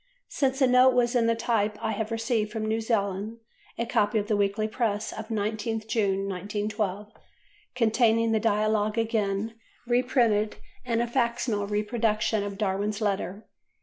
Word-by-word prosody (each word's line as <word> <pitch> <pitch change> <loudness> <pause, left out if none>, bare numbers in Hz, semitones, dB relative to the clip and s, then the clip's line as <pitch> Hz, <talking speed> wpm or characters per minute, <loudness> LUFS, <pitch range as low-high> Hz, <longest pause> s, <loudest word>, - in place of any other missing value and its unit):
Since 270 -2 0
the 270 - +4
note 250 0 +5
was 240 0 +2
in 230 -2 +3
type 215 -3 0
I 220 - -2
have 215 0 -3
received 225 -2 -1
from 220 -1 -3
New 220 +1 0
Zealand 210 -1 -1 0.4
a 235 - -1
copy 220 -1 +1
of 205 - 0
the 215 - +1
Weekly 205 +1 +1
Press 215 -2 -1
of 220 - -7
19th 220 0 -2
June, 195 -4 0
1912, 205 +1 -3 0.6
containing 230 -1 +3
the 220 - +2
Dialogue 215 0 +1
again 220 -1 0 0.3
reprinted 240 -4 +2 0.3
and 235 -1 0
a - - -2
facsimile 235 -4 0
reproduction 215 0 0
of 200 -1 -5
Darwin's 205 +1 -1
letter. 200 -1 -2
220 Hz, 150 wpm, -27 LUFS, 205-230 Hz, 0.6 s, note